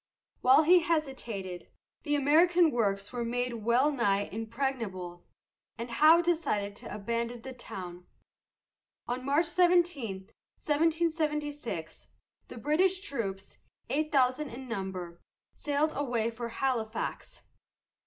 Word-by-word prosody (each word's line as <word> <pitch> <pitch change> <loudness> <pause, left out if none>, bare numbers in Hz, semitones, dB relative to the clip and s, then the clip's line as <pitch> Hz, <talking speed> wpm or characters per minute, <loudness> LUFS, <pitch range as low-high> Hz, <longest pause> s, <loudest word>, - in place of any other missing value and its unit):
While 265 +5 +6
he 355 +3 +7
hesitated, 260 - -3 0.3
the 295 -2 0
American 325 +4 +4
works 200 -3 -1
were 240 -1 -2
made 240 -1 -2
well 245 +6 +3
nigh 205 -7 +1
impregnable, 220 -6 -4 0.5
and 235 +2 -6
Howe 315 +8 +6
decided 215 -13 0
to - - -9
abandon 230 +3 -3
the 265 0 -7
town. 180 -7 -9 1.0
On 250 +1 -3
March 285 +5 +2
17, 340 - +1 0.3
1776, 300 - -1 0.4
the - - -10
British 350 - +2
troops, 200 - -5 0.3
eight 305 +2 0
thousand 265 +1 +2
in 255 +3 -9
number, 190 -6 -5 0.3
sailed 295 +1 0
away 240 -5 -1
for 235 +1 -5
Halifax. 230 -3 -3
250 Hz, 110 wpm, -30 LUFS, 215-305 Hz, 1.0 s, he